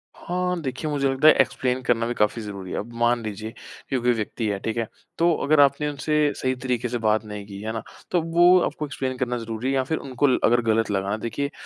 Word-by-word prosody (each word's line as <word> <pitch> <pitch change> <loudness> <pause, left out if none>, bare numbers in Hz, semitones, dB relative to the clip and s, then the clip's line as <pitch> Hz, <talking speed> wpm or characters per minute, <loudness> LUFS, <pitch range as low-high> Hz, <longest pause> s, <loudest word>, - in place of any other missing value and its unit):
हाँ, 180 0 -2
देखिए, 135 +3 -3
मुझे 140 -2 +1
लगता 135 +3 +3
है 155 - +10
एक्सप्लेन 130 0 -1
करना 120 -2 +1
भी 120 - -1
काफ़ी 105 0 +1
ज़रूरी 100 -3 -7
है। - - -3
अब 115 +3 -7
मान 120 0 +2
लीजिए 110 +1 -5 0.4
कि 135 - +1
कोई 120 +1 +2
व्यक्ति 110 0 -3
है, 100 -1 -1
ठीक 110 +2 -3
है? 115 -2 -1 0.3
तो 170 0 +4
अगर 155 0 +3
आपने 145 +1 +4
उनसे 150 +1 -1 0.2
सही 130 0 -1
तरीके 125 -1 -2
से 120 - -1
बात 110 -1 +1
नहीं 105 -1 -7
की, 100 -1 -8
है 110 +1 -3
ना? 115 - -4 0.3
तो 175 -2 +2
वो 175 +2 +5
आपको 150 0 -3
एक्सप्लेन 130 -2 -4
करना 125 -1 -1
ज़रूरी 115 +1 -4
है 135 - +1
या 130 - +2
फिर 160 +4 -2
उनको 135 +1 0
ल 130 - +3
अगर 120 +1 +4
गलत 115 -1 +1
लगा 95 0 -1
ना 105 - 0
देखिए, 140 +6 -3
125 Hz, 245 wpm, -24 LUFS, 110-140 Hz, 0.4 s, है